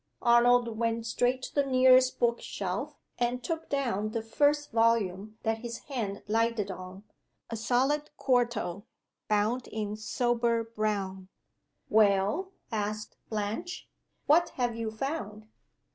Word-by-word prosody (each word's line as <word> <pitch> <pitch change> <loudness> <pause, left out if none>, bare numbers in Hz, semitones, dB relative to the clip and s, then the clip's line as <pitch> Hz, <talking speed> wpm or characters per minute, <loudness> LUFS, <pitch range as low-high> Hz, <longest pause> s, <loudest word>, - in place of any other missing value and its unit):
Arnold 240 -1 +4
went 230 0 0
straight 245 +3 0
to - - -6
the 285 - +3
nearest 255 -1 +5
book 235 0 +1
shelf, - - -4 0.2
and 245 +1 0
took 325 -1 -4
down 235 -7 0
the 220 0 -3
first 290 +5 +1
volume 220 -3 +1
that 225 0 0
his 235 0 -5 0.2
hand 205 -6 -3
lighted 225 -2 +1
on 185 +1 -9 0.5
a - - -2
solid 260 +7 +1
quarto, 235 -6 0 0.4
bound 215 +4 +1
in 210 -1 -3
sober 235 +2 0
brown. 205 -4 -3 0.6
"Well?" 210 - +3 0.2
asked 215 -1 -3
Blanche. 220 - -3 0.4
"What 330 +3 +4
have 245 -2 0
you 230 -1 -3
found?" 220 -3 -4
230 Hz, 125 wpm, -29 LUFS, 215-250 Hz, 0.6 s, nearest